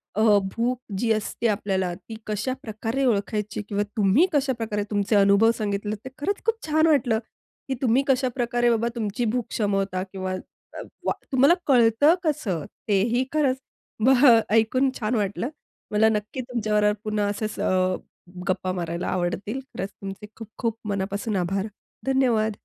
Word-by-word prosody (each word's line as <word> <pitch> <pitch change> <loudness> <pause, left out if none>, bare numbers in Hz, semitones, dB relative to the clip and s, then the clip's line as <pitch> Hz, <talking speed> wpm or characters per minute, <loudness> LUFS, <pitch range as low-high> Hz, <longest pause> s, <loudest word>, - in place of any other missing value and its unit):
अ, 215 -1 +5 0.2
भूक 240 +2 0 0.2
जी 225 +3 +1
असते 220 +2 -2
आपल्याला, 190 -4 0
ती 220 +4 -10
कशाप्रकारे 225 +2 -2
ओळखायची? 210 -1 -1
किंवा 205 0 0
तुम्ही 210 - +5
कशाप्रकारे 230 -7 0
तुमचे 205 +1 +1
अनुभव 200 +3 +5
सांगितले, 205 0 -2
ते 260 - -5
खरंच 395 +7 -2
खूप 455 - +2
छान 315 +1 +3
वाटल, 245 -7 +3 0.5
की 265 - -1
तुम्ही 255 +2 +3
कशाप्रकारे 245 -2 +1
बाबा 230 0 +2
तुमची 225 +2 -2
भूक 245 -2 0
क्षमवता? 195 -3 -1
किंवा 190 -1 -4 0.4
अ, - - -7 0.3
व - - +3 0.2
तुम्हाला 275 +5 +5
कळतं 245 +4 +5
कसं? 200 - -1 0.2
तेही 225 +5 +2
खरंच 275 -4 +2 0.5
बह 265 +2 +6 0.3
ऐकून 255 +4 +3
छान 230 +1 0
वाटलं. 205 +4 -1 0.4
मला 220 +1 +4
नक्की 215 +4 -2
तुमच्याबरोबर 215 -4 +1
पुन्हा 210 -1 0
असंच 215 +1 -4 0.9
गप्पा 185 0 0
मारायला 170 -1 -3
आवडतील. 185 +7 -2
खरंच 225 -7 -6
तुमचे 195 +1 -9
खूप-खूप 225 +1 -4
मनापासून 200 +2 -2
आभार. 190 +3 -1 0.4
धन्यवाद. 240 -5 +2
220 Hz, 140 wpm, -25 LUFS, 200-250 Hz, 0.9 s, बह